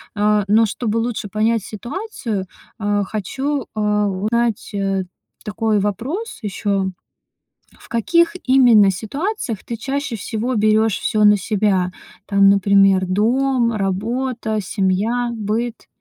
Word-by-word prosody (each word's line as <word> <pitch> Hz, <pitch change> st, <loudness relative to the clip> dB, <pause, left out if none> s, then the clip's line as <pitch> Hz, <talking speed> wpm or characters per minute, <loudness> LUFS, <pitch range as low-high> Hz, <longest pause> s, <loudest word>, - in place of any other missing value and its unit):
Э. 210 Hz, -1 st, +2 dB
Но 220 Hz, +3 st, +4 dB
чтобы 220 Hz, +1 st, -2 dB
лучше 230 Hz, -2 st, -3 dB
понять 215 Hz, +1 st, 0 dB
ситуацию, 235 Hz, -, -5 dB, 0.3 s
э, 205 Hz, -1 st, 0 dB
хочу, 265 Hz, +7 st, -3 dB
э, 215 Hz, -, -3 dB, 0.3 s
узнать, 215 Hz, +3 st, -1 dB
э, 195 Hz, -1 st, -1 dB, 0.4 s
такой 215 Hz, 0 st, 0 dB
вопрос 255 Hz, -, -3 dB
ещё. 200 Hz, -1 st, -1 dB, 0.9 s
В -, -, -17 dB
каких 335 Hz, -, +2 dB
именно 240 Hz, -7 st, +5 dB
ситуациях 240 Hz, -, -4 dB
ты 235 Hz, -, -5 dB
чаще 275 Hz, 0 st, -3 dB
всего 225 Hz, +4 st, -3 dB
берёшь 215 Hz, -1 st, +2 dB
всё 215 Hz, -1 st, +1 dB
на 210 Hz, 0 st, +6 dB
себя? 190 Hz, -2 st, 0 dB, 0.4 s
Там 200 Hz, -1 st, +5 dB
например, 195 Hz, -1 st, +4 dB
дом, 235 Hz, +5 st, +1 dB
работа, 220 Hz, +3 st, -2 dB
семья, 210 Hz, +6 st, 0 dB
быт. 225 Hz, +2 st, -3 dB
215 Hz, 115 wpm, -19 LUFS, 200-240 Hz, 0.9 s, на